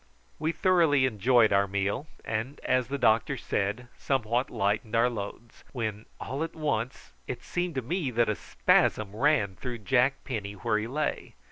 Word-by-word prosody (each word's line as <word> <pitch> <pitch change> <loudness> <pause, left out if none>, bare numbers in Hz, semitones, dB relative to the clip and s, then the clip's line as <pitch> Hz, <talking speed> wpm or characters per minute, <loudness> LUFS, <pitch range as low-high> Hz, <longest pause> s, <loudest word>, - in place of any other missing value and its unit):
We 155 +1 0
thoroughly 165 -7 +3
enjoyed 120 -1 +4
our 100 0 +3
meal, 100 +8 -1 0.2
and, 115 +6 -3
as 130 -2 +1
the 140 +2 -2
doctor 110 -3 +2
said, 105 +6 -2
somewhat 125 -1 0
lightened 105 +2 -1
our 120 +2 +4
loads, 110 +1 -7
when 110 -4 -4
all 140 +4 -3
at 165 - -6
once 125 -6 -2 0.2
it - - -5
seemed 175 -2 -2
to 130 - -1
me 160 +2 -1
that 120 -1 +2
a 105 - +2
spasm 105 0 +1
ran 110 -7 +2
through 125 -2 -5
Jack 130 +4 +1
Penny 105 -5 -4
where 105 +1 0
he 110 - -3
lay. 150 +5 -3
120 Hz, 165 wpm, -28 LUFS, 105-135 Hz, 0.2 s, enjoyed